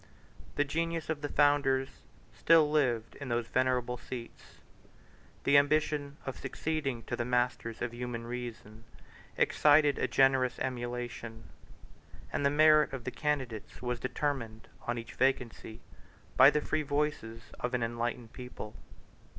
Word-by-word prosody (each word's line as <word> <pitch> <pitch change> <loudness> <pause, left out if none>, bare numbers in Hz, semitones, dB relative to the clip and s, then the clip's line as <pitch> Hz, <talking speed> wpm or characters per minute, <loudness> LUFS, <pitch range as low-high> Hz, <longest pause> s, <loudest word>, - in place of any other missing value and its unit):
The 145 - +3
genius 165 +2 -2
of 150 -2 -4
the 145 - -3
founders 140 -2 +3 0.4
still 160 -3 +4
lived 125 -7 +1
in 140 -3 -7
those 120 0 0
venerable 125 0 0
seats; 120 -1 -9 0.9
the 140 +1 +6
ambition 145 -1 0
of 135 - -5
succeeding 135 -3 -3
to - - -3
the 120 - -2
masters 120 -2 -1
of 120 -1 -3
human 120 -1 -5
reason 115 -2 -7 0.5
excited 145 -1 +4
a - - +1
generous 130 0 +3
emulation; 120 -2 -4 0.9
and - - -1
the 140 - +4
merit 155 0 +5
of 130 -3 -5
the 130 - -4
candidates 130 -8 -3
was 125 -1 -2
determined, 125 -3 -3 0.2
on 120 0 -1
each 115 0 -7
vacancy, 120 -3 -1 0.5
by 130 +2 +9
the 150 0 0
free 155 - -1
voices 145 -6 -3
of 125 +1 -1
an 125 - 0
enlightened 120 0 -3
people. 125 -4 -8
130 Hz, 135 wpm, -31 LUFS, 120-145 Hz, 0.9 s, by